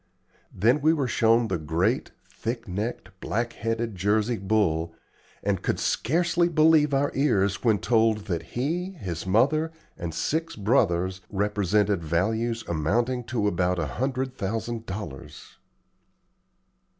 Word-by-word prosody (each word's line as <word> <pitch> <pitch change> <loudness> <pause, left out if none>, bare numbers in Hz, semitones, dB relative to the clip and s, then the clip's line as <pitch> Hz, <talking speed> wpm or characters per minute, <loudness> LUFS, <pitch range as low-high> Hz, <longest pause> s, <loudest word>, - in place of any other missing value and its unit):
Then 120 +9 +2
we 155 +2 +4
were 140 -5 0
shown 115 0 +3
the 90 -5 -2
great, 80 +2 0 0.2
thick 115 0 -5
necked, 100 +1 -4
black 120 +4 -2
headed 115 0 -2
Jersey 105 +5 +1
bull, 85 -5 0 0.5
and 100 -2 0
could - - -1
scarcely 170 +5 +1
believe 155 -2 +4
our 140 +1 +1
ears 100 -8 +1
when 110 -4 +4
told 110 -2 +2
that 85 -6 -2 0.2
he, 175 +9 -1
his 95 - -6
mother, 145 +11 +2 0.3
and 85 -2 -3
six 160 - -2
brothers 95 -4 +1
represented 105 -1 +1
values 110 +8 0
amounting 115 +10 0
to 110 -3 -1
about 90 -1 +1
a 85 - -1
hundred 130 - -2
thousand 115 +2 -3
dollars. 95 -8 -8
110 Hz, 125 wpm, -26 LUFS, 95-130 Hz, 0.5 s, we